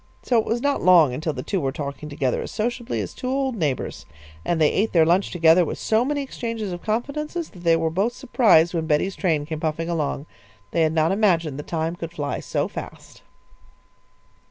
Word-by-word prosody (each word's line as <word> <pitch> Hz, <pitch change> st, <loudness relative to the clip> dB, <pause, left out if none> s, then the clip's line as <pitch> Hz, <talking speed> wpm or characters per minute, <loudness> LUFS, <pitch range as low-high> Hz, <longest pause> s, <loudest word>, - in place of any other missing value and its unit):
So 240 Hz, -3 st, +3 dB
it 220 Hz, -, -1 dB
was 235 Hz, +2 st, 0 dB
not 285 Hz, 0 st, +1 dB
long 170 Hz, -8 st, +6 dB
until 155 Hz, +5 st, -2 dB
the 130 Hz, -1 st, -5 dB
two 195 Hz, -4 st, -1 dB
were 135 Hz, -, -1 dB
talking 140 Hz, +1 st, -6 dB
together 140 Hz, -3 st, -1 dB
as -, -, -6 dB
sociably 240 Hz, +2 st, -2 dB
as -, -, -6 dB
two 255 Hz, -, -5 dB
old 265 Hz, -1 st, 0 dB
neighbours, 150 Hz, -, -3 dB, 0.4 s
and 170 Hz, -, 0 dB
they 155 Hz, -2 st, +4 dB
ate 215 Hz, +3 st, 0 dB
their 165 Hz, -3 st, +5 dB
lunch 180 Hz, +4 st, +2 dB
together 170 Hz, 0 st, +5 dB
with 160 Hz, -, -4 dB
so 220 Hz, +1 st, +1 dB
many 285 Hz, +2 st, -1 dB
exchanges 230 Hz, -6 st, -4 dB
of 175 Hz, 0 st, -6 dB
confidences 300 Hz, +9 st, -3 dB
that 180 Hz, -, -14 dB
they 165 Hz, -1 st, +4 dB
were 165 Hz, -1 st, 0 dB
both 200 Hz, +8 st, 0 dB
surprised 185 Hz, -11 st, +3 dB
when 165 Hz, -2 st, -2 dB
Betty's 165 Hz, +5 st, +1 dB
train 160 Hz, -6 st, 0 dB
came 155 Hz, 0 st, -5 dB
puffing 160 Hz, +1 st, -2 dB
along. 150 Hz, -3 st, -2 dB, 0.5 s
They 165 Hz, -, +1 dB
had 160 Hz, 0 st, +2 dB
not 160 Hz, 0 st, +2 dB
imagined 170 Hz, -8 st, +1 dB
the -, -, -5 dB
time 165 Hz, +1 st, -2 dB
could 165 Hz, -1 st, -6 dB
fly 145 Hz, -3 st, -3 dB
so -, -, -2 dB
fast. -, -, -9 dB
170 Hz, 205 wpm, -23 LUFS, 155-225 Hz, 0.5 s, long